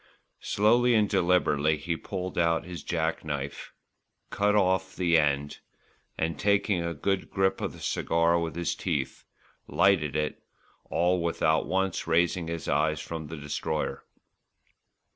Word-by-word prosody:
Slowly 120 Hz, +4 st, +3 dB
and 105 Hz, -1 st, +3 dB
deliberately 85 Hz, -5 st, +2 dB
he 80 Hz, +3 st, -3 dB
pulled 95 Hz, +1 st, -5 dB
out 85 Hz, -1 st, +1 dB
his 90 Hz, -3 st, -7 dB
jack 80 Hz, 0 st, -2 dB
knife, 70 Hz, -2 st, -5 dB, 0.6 s
cut 105 Hz, +1 st, +2 dB
off 95 Hz, -1 st, +1 dB
the 85 Hz, -2 st, +2 dB
end 70 Hz, -2 st, +1 dB, 0.6 s
and, 80 Hz, +1 st, -2 dB
taking 100 Hz, -3 st, +2 dB
a 85 Hz, 0 st, -3 dB
good 95 Hz, +6 st, -1 dB
grip 95 Hz, 0 st, 0 dB
of -, -, -3 dB
the -, -, -13 dB
cigar 85 Hz, +1 st, +1 dB
with 85 Hz, -1 st, -3 dB
his 85 Hz, 0 st, -1 dB
teeth, -, -, -3 dB, 0.4 s
lighted 85 Hz, -6 st, +2 dB
it, 75 Hz, 0 st, -2 dB, 0.4 s
all 90 Hz, +1 st, +1 dB
without 80 Hz, -2 st, +1 dB
once 95 Hz, -2 st, -1 dB
raising 85 Hz, +1 st, +1 dB
his 85 Hz, -1 st, -5 dB
eyes 80 Hz, 0 st, +1 dB
from 80 Hz, 0 st, -6 dB
the 80 Hz, +2 st, -7 dB
Destroyer. 75 Hz, +1 st, -3 dB
85 Hz, 140 wpm, -28 LUFS, 80-95 Hz, 0.6 s, Slowly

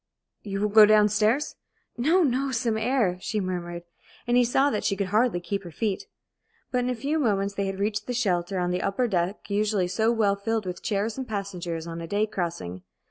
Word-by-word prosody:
"You 195 Hz, -1 st, -4 dB
will 210 Hz, -, +1 dB
go 215 Hz, 0 st, +8 dB
down 210 Hz, -1 st, +5 dB
stairs?" 215 Hz, +8 st, +1 dB, 0.4 s
"No, 325 Hz, +9 st, +3 dB
no 270 Hz, -1 st, +1 dB
some 230 Hz, -2 st, 0 dB
air!" 220 Hz, -5 st, +1 dB
she 215 Hz, -, -2 dB
murmured, 175 Hz, -2 st, -4 dB, 0.4 s
and 240 Hz, -, +1 dB
he 245 Hz, -, +6 dB
saw 270 Hz, +4 st, +2 dB
that 210 Hz, -, -2 dB
she 195 Hz, -, +1 dB
could 195 Hz, -1 st, -2 dB
hardly 215 Hz, -1 st, +2 dB
keep 195 Hz, +3 st, -3 dB
her 175 Hz, -, -8 dB
feet. 200 Hz, +4 st, -2 dB, 0.6 s
But 250 Hz, -, +1 dB
in 250 Hz, 0 st, 0 dB
a 250 Hz, -, 0 dB
few 285 Hz, +7 st, -1 dB
moments 200 Hz, -6 st, +1 dB
they 200 Hz, -1 st, -2 dB
had 195 Hz, 0 st, -3 dB
reached 205 Hz, +1 st, -2 dB
the 250 Hz, -, -2 dB
shelter 190 Hz, -5 st, 0 dB
on 180 Hz, 0 st, 0 dB
the 180 Hz, -, -1 dB
upper 200 Hz, +6 st, 0 dB
deck 185 Hz, -1 st, -1 dB
usually 205 Hz, -2 st, +1 dB
so 220 Hz, +5 st, +1 dB
well 215 Hz, -4 st, +2 dB
filled 215 Hz, +1 st, -2 dB
with 180 Hz, -1 st, -5 dB
chairs 210 Hz, +4 st, -1 dB
and 260 Hz, -, -4 dB
passengers 180 Hz, -6 st, -4 dB
on 170 Hz, 0 st, -6 dB
a 165 Hz, -, -6 dB
day 205 Hz, +4 st, +1 dB
crossing. 170 Hz, -, -4 dB
205 Hz, 215 wpm, -26 LUFS, 185-230 Hz, 0.6 s, go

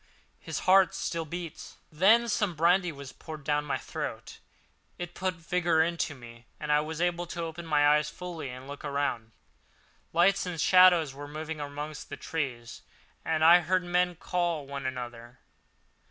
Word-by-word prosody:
"His -, -, -5 dB
heart 190 Hz, 0 st, +5 dB
still 165 Hz, -1 st, -3 dB
beats!" 170 Hz, 0 st, -7 dB
Then 210 Hz, +9 st, +5 dB
some 205 Hz, -5 st, 0 dB
brandy 175 Hz, +3 st, +3 dB
was 140 Hz, -3 st, -9 dB
poured 155 Hz, -3 st, -9 dB
down 150 Hz, 0 st, 0 dB
my 145 Hz, -, -1 dB
throat; -, -, -6 dB, 0.6 s
it 175 Hz, 0 st, -6 dB
put 185 Hz, 0 st, -2 dB
vigour 165 Hz, -1 st, +1 dB
into 165 Hz, -3 st, -2 dB
me, 120 Hz, -2 st, -13 dB
and 150 Hz, -1 st, -3 dB
I 150 Hz, -, +5 dB
was 155 Hz, +1 st, -4 dB
able 175 Hz, 0 st, 0 dB
to 170 Hz, 0 st, -4 dB
open 165 Hz, +1 st, -6 dB
my 145 Hz, -2 st, +4 dB
eyes 150 Hz, +1 st, +3 dB
fully 175 Hz, -6 st, -7 dB
and 130 Hz, +1 st, -9 dB
look 145 Hz, 0 st, -8 dB
around. 140 Hz, -6 st, -2 dB, 0.8 s
Lights 185 Hz, +3 st, +3 dB
and 175 Hz, -2 st, -4 dB
shadows 175 Hz, -5 st, +6 dB
were 145 Hz, +1 st, -8 dB
moving 155 Hz, +1 st, -6 dB
among 145 Hz, +1 st, -5 dB, 0.2 s
the 145 Hz, -, -6 dB
trees, 130 Hz, -8 st, -4 dB, 0.4 s
and 160 Hz, -1 st, 0 dB
I 170 Hz, +2 st, +9 dB
heard 180 Hz, +1 st, 0 dB
men 180 Hz, 0 st, +1 dB
call 170 Hz, -3 st, -2 dB
to 140 Hz, -, -15 dB
one 140 Hz, -1 st, -3 dB
another. 120 Hz, -1 st, -7 dB
160 Hz, 170 wpm, -29 LUFS, 145-175 Hz, 0.8 s, I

